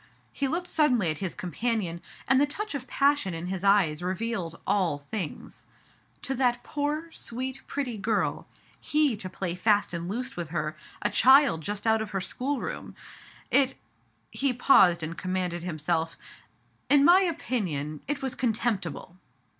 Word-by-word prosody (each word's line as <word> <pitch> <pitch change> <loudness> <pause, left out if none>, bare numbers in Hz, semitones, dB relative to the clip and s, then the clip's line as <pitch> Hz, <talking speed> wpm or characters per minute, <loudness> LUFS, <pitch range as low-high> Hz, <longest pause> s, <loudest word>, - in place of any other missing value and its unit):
*' - - -37
He 275 - +3
looked 340 +6 -2
suddenly 250 - +2
at 155 - -5
his 190 -3 -3
companion, 180 -1 -2 0.3
and 265 0 +5
the 290 - +4
touch 415 +8 -4
of 270 -2 -5
passion 280 -10 +2
in 165 +1 -5
his 185 0 -4
eyes 195 -6 +3
revealed 185 -2 -3
all 165 -8 0
things. 190 -9 -6 0.6
"To 270 - -2
that 245 -2 +1
poor, 300 +3 -3
sweet, 260 +1 -4
pretty 250 -6 -3
girl. 215 +1 -1 0.3
He 300 -5 +2
to 185 -3 -5
play 185 -1 -3
fast 205 +1 +2
and 170 +1 -4
loose 250 +6 -3
with 170 -3 -5
her, 155 -1 -2 0.3
a - - +1
child 265 - +6
just 205 +5 -4
out 220 0 +3
of 220 - -4
her 195 -2 -2
schoolroom. 265 +8 -4 0.6
It 270 -2 +4 0.2
" - - -40
— - - -41
he 270 -2 +1
paused 190 - +5
and 160 +2 -4
commanded 180 -1 -2
himself 165 -1 -2 0.3
— - - -36
" - - -41
In 285 -1 +6
my 360 +4 +7
opinion 180 - -2
it 285 0 -3
was 265 -2 -1
contemptible." 215 - -2
215 Hz, 170 wpm, -27 LUFS, 175-270 Hz, 0.6 s, my